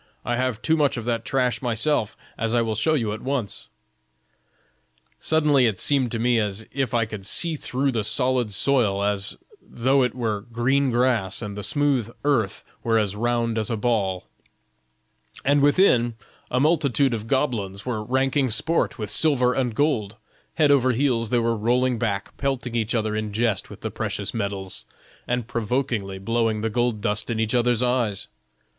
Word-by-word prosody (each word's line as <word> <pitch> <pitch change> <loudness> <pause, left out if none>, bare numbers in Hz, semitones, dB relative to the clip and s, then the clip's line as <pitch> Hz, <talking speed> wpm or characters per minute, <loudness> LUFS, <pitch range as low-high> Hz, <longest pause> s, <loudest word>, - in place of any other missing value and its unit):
I 120 - 0
have 125 -1 -2
too 160 - +3
much 145 -4 +1
of 115 - -5
that 115 -2 -1
trash 125 -4 0
myself, 120 -1 0 0.2
as 115 +1 -1
I 120 - +3
will 110 -1 -1
show 135 +9 +1
you 115 -7 -1
at 110 - -7
once?'" 125 - -3 1.5
"Suddenly 150 -5 +3
it 105 -4 -1
seemed 130 +1 +2
to 115 - -1
me 120 +1 +2
as 105 0 -2
if 135 -3 -1
I 115 -1 +2
could 105 -3 -7
see 165 - +2
through 135 -1 -1
the 115 -4 -1
solid 125 -1 +1
soil 105 -3 +2
as 100 0 0 0.2
though 135 +3 +1
it 125 -1 0
were 110 -5 -2
green 135 +4 +2
glass 120 -5 +1
and 100 -1 -5
the 105 - -5
smooth 140 -2 +1 0.2
earth 115 -9 +1 0.2
were 115 -1 +2
as 105 -2 0
round 115 0 0
as 110 - -2
a 115 - -1
ball; 105 -5 0 1.2
and 145 +1 +4
within, 140 - +4 0.3
a 125 - 0
multitude 140 -3 +2
of 110 -1 -4
goblins 110 -8 -1
were 115 -4 -2
ranking 130 +2 +1
sport 160 +9 0
with 105 -3 -2
silver 130 -6 +3
and 125 -4 -1
gold; 115 -8 0 0.4
head 150 -3 +4
over 130 -2 +4
heels 120 -3 +1
they 120 - +2
were 115 0 +1
rolling 125 +3 +1
about, 100 -3 -3
pelting 135 -3 -2
each 115 0 0
other 110 -1 0
in 110 -1 -3
jest 110 -2 0
with - - -11
the - - -4
precious - - -3
metals, 100 -3 -3 0.4
and 125 -2 -1
provokingly 115 -4 -2
blowing 115 +1 0
the 110 0 -1
gold 120 -2 0
dust 105 +2 0
in 115 -1 -1
each 110 +1 0
other's 120 -1 +2
eyes. 120 -5 0
120 Hz, 175 wpm, -24 LUFS, 110-130 Hz, 1.5 s, and